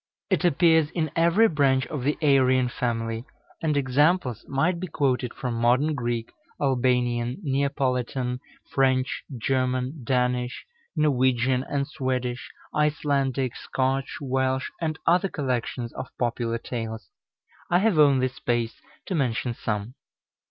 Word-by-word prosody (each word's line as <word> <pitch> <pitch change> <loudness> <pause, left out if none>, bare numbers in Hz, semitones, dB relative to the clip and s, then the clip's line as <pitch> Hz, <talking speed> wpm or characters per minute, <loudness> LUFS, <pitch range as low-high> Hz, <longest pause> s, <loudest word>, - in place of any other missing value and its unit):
It - - +2
appears 160 -2 +4
in 160 -3 -2
every 170 +7 +5
branch 135 -6 +2
of 150 -4 -5
the 145 +4 0
Aryan 130 -3 +4
family, 115 -2 -2 0.4
and 155 -3 +1
examples 140 - +2
might 165 +6 +1
be 185 - -4
quoted 130 -5 0
from 125 -2 -4
Modern 125 +6 +2
Greek, 120 -4 -2 0.3
Albanian, 125 -3 +1
Neapolitan, 130 -3 -1 0.3
French, 130 -1 +1 0.2
German, 130 +3 -1
Danish, 125 0 0 0.3
Norwegian 130 -4 +2
and 140 -1 -1
Swedish, 130 -4 -3 0.2
Icelandic, 140 -4 0
Scotch, 135 0 -1
Welsh, 130 -1 -1
and 155 -2 -1
other 180 +3 +3
collections 125 -4 -2
of 130 - -6
popular 120 -1 -1
tales. 110 -5 -6 0.6
I 175 - +4
have 195 -4 +2
only 135 -3 +5
space 120 -3 -2 0.2
to 195 - -3
mention 125 -5 0
some. 105 0 -3
130 Hz, 120 wpm, -25 LUFS, 125-145 Hz, 0.6 s, every